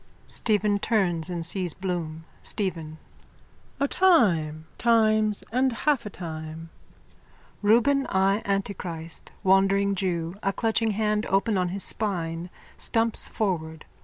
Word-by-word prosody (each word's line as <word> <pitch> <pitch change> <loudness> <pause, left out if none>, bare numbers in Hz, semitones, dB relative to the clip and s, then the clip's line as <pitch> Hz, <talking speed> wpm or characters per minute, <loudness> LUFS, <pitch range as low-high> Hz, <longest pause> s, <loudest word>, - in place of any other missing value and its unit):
(Stephen 210 -2 +1
turns 180 -7 +1
and 170 -2 -3
sees 175 -1 -1
Bloom.) 170 -4 -4 0.2
STEPHEN: 165 -6 -2 0.8
A 280 - +2
time, 170 - +3
times 215 -2 +3
and 255 +2 +2
half 235 -1 0
a - - -4
time. 160 -2 -7 0.9
_(Reuben 250 +6 +3
J 195 +2 +2
Antichrist, 175 -5 -3
wandering 195 +1 +3
jew, 180 -2 -2
a 195 - 0
clutching 225 0 0
hand 210 0 0
open 200 +3 +1
on 180 -1 +1
his 195 +2 -3
spine, 175 -5 -3 0.3
stumps 225 0 +2
forward. 160 -7 -3
195 Hz, 115 wpm, -26 LUFS, 170-215 Hz, 0.9 s, time